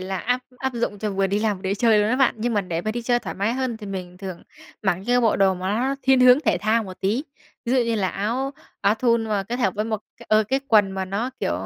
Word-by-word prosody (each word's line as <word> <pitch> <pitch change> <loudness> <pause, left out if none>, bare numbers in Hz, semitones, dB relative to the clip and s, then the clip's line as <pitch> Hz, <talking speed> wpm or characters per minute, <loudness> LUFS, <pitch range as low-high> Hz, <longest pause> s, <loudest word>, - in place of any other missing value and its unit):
là 190 +1 -3
áp 250 +7 0 0.2
áp 265 -1 -2
dụng 220 -3 -2
cho 210 0 -2
vừa 195 0 +1
đi 200 +2 0
làm 210 -1 0
vừa 185 - -15
để 190 - -2
đi 200 - +1
chơi 220 0 +4
luôn 210 - +2
á 250 - +2
bạn, 265 -1 +3
nhưng 235 +1 -1
mà 205 - +3
để 170 -3 -3
mà 215 - -2
đi 240 +2 -4
chơi 240 +1 +2
thoải 235 -5 -6
mái 200 +4 0
hơn 255 -2 -2
thì 215 -2 -9
mình 180 -2 -6
thường 190 -3 -7 0.4
mặc 190 -3 +2
những 245 0 +3
bộ 225 - +3
đồ 195 -1 +3
mà 185 +1 -4
nó 265 +3 0
thiên 265 -1 +4
hướng 250 +2 +7
thể 305 - +1
thao 225 +2 +1
một 185 -2 -10
tí. 220 +10 0 0.4
Ví 240 - -1
dụ 265 - +4
như 235 -2 +1
là 195 -4 0
áo 235 +9 -2 0.3
áo 200 +2 +3
thun 230 -1 +1
mà 210 -2 -1
kết 230 +5 -4
hợp 195 -7 +1
với 210 - -1
một 220 -2 -2 0.2
cái - - -15
ờ, 215 0 +5
cái 270 +1 +1
quần 205 -3 +5
mà 190 0 -2
nó, 200 +7 -2
kiểu, - - 0
215 Hz, 300 wpm, -23 LUFS, 195-240 Hz, 0.4 s, hướng